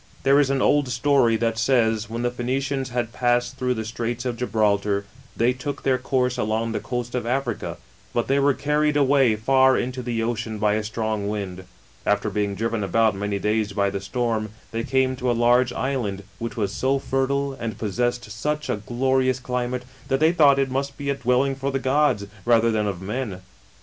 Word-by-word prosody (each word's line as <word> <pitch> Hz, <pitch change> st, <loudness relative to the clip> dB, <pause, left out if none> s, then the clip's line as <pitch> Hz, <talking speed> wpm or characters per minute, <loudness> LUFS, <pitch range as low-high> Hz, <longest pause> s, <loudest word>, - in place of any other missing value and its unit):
There 135 Hz, -, +4 dB
:^ 145 Hz, -1 st, +4 dB
an 135 Hz, -1 st, +1 dB
old 145 Hz, -3 st, +3 dB
story 125 Hz, -2 st, +3 dB
that 115 Hz, 0 st, 0 dB
says, 115 Hz, -3 st, +2 dB
when 115 Hz, +2 st, -3 dB
the 120 Hz, -, +1 dB
Phoenicians 130 Hz, +2 st, -2 dB
nad 120 Hz, -1 st, -2 dB
passed 120 Hz, +1 st, +1 dB
through 125 Hz, -1 st, 0 dB
the 110 Hz, -1 st, -4 dB
Straits 120 Hz, +2 st, -3 dB
of 125 Hz, -2 st, -1 dB
Gibraltar, 105 Hz, -4 st, +1 dB, 0.3 s
tney 120 Hz, +2 st, +2 dB
took 140 Hz, +3 st, -5 dB
their 130 Hz, -1 st, +2 dB
course 125 Hz, -1 st, 0 dB
along 110 Hz, 0 st, 0 dB
the 110 Hz, -, -2 dB
coast 120 Hz, -1 st, -4 dB
of 125 Hz, -2 st, -2 dB
Africa; 125 Hz, -2 st, -2 dB, 0.3 s
but 120 Hz, -, -1 dB
tluy 140 Hz, +1 st, +2 dB
were 140 Hz, -1 st, +3 dB
carried 150 Hz, 0 st, +1 dB
away 135 Hz, -5 st, +4 dB
far 130 Hz, +4 st, +4 dB
into 125 Hz, +1 st, -2 dB
the 120 Hz, -1 st, -2 dB
iceni 115 Hz, -1 st, -2 dB
by 105 Hz, 0 st, +2 dB
a 110 Hz, 0 st, 0 dB
strong 110 Hz, -1 st, -2 dB
wind. 95 Hz, -3 st, -4 dB, 0.4 s
After -, -, +1 dB
being 100 Hz, -1 st, -1 dB
driven 115 Hz, 0 st, -1 dB
about 110 Hz, +3 st, +2 dB
many 100 Hz, +1 st, -2 dB
days 105 Hz, 0 st, 0 dB
by 100 Hz, -1 st, +1 dB
the 100 Hz, -, -3 dB
stoi 115 Hz, +3 st, -1 dB
rn, 110 Hz, 0 st, -5 dB, 0.2 s
they 115 Hz, 0 st, -2 dB
came 130 Hz, +1 st, +1 dB
to 125 Hz, -1 st, -1 dB
a -, -, +3 dB
large 120 Hz, +1 st, +4 dB
island, 120 Hz, -7 st, -2 dB, 0.2 s
which 115 Hz, +1 st, -5 dB
was 100 Hz, -3 st, -1 dB
so 135 Hz, +4 st, +1 dB
fertile 135 Hz, +1 st, -1 dB
and 115 Hz, -5 st, -5 dB
possessed 120 Hz, +2 st, -2 dB
such 150 Hz, +7 st, -2 dB
a -, -, -1 dB
glorious 130 Hz, +4 st, +1 dB
climate, 125 Hz, 0 st, -2 dB, 0.2 s
that 135 Hz, -1 st, +1 dB
they 160 Hz, +2 st, +5 dB
thought 145 Hz, -5 st, +5 dB
it 135 Hz, -1 st, +1 dB
must 135 Hz, +1 st, -2 dB
be 140 Hz, -1 st, -2 dB
a -, -, +2 dB
dwelling 130 Hz, +1 st, +1 dB
for 135 Hz, +1 st, -2 dB
the 135 Hz, -, 0 dB
gods, 130 Hz, -5 st, +2 dB, 0.2 s
rather 115 Hz, -1 st, +4 dB
than 105 Hz, -1 st, 0 dB
of 95 Hz, -2 st, -4 dB
men. 105 Hz, -2 st, -4 dB
120 Hz, 200 wpm, -23 LUFS, 110-135 Hz, 0.4 s, they